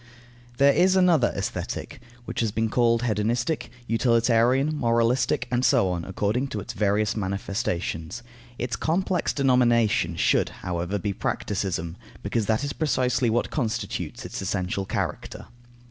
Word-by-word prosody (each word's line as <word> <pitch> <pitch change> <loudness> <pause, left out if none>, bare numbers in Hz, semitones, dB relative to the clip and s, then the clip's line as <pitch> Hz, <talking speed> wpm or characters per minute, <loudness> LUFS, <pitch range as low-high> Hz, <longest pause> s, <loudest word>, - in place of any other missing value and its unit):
There 140 +1 +5
is 185 +1 +4
another 175 -9 +4
Aesthetic, - - -4 0.2
which 115 - -5
has 115 -2 +1
been 110 +1 0
called 115 0 +2
hedonistic, 120 +6 -1 0.2
utilitarian, 120 +4 +2
moralistic, 120 -1 +1
and 125 0 +1
so 100 -7 +3
on, 85 -2 -3
according 105 +7 -1
to 110 - -4
its - - -7
various 105 +1 +1
manifestations. 100 -1 -3 0.3
Its 120 -1 -2
complex 180 +4 0
denomination 120 - +2
should, - - +2 0.2
however, 90 +2 -2
be 100 +1 -2
practicism, 90 -4 -3 0.3
because 115 -3 -1
that 110 +4 +1
is 145 - -2
precisely 125 -5 +1
what 120 +2 0
constitutes 115 -7 -3
its - - -5
essential 95 +1 -2
character. - - -4
115 Hz, 130 wpm, -25 LUFS, 100-125 Hz, 0.3 s, There